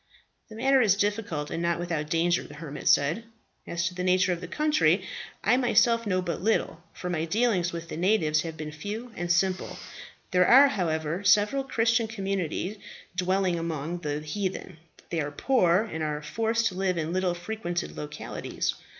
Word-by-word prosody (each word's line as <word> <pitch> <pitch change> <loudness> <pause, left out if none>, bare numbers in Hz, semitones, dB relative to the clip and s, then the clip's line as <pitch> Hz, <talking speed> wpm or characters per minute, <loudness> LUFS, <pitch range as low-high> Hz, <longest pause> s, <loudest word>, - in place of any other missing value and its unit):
"The 215 - -10
matter 265 +3 +3
is 205 -4 +4
difficult 200 -8 -1
and 165 - -2
not 170 0 +1
without 165 -3 -3
danger," 170 +1 +2
the 145 - -11
hermit 150 -2 -7
said. 155 +10 +3 0.4
"As 170 0 -2
to 175 - -1
the 180 0 -4
nature 185 0 +3
of 170 - -6
the 180 - -6
country, 305 - +2 0.4
I 245 - +4
myself 235 -2 +3
know 185 -2 +1
but 170 -1 -3
little, 190 -5 0
for 180 - -7
my 165 -2 -1
dealings 200 -2 +1
with 170 0 -6
the - - -5
natives 165 -5 +2
have 160 -1 -6
been 150 0 -5
few 210 +10 -6
and 175 0 -2
simple. 185 +1 0 0.5
There 180 0 +4
are, 275 +3 +8
however, 165 - -1
several 210 +8 +4
Christian 230 -2 +1
communities 195 -2 -3 0.4
dwelling 185 -1 +1
among 165 +1 -3
the 150 -2 -3
heathen. 185 +2 -4 0.3
They 165 - 0
are 145 - -2
poor, 180 - +2
and 160 -8 -5
are 150 -1 -2
forced 225 +6 0
to - - -10
live 185 -1 0
in 160 +1 -2
little 185 -1 0
frequented 175 -1 -4
localities. 150 0 -4
180 Hz, 175 wpm, -27 LUFS, 165-215 Hz, 0.5 s, are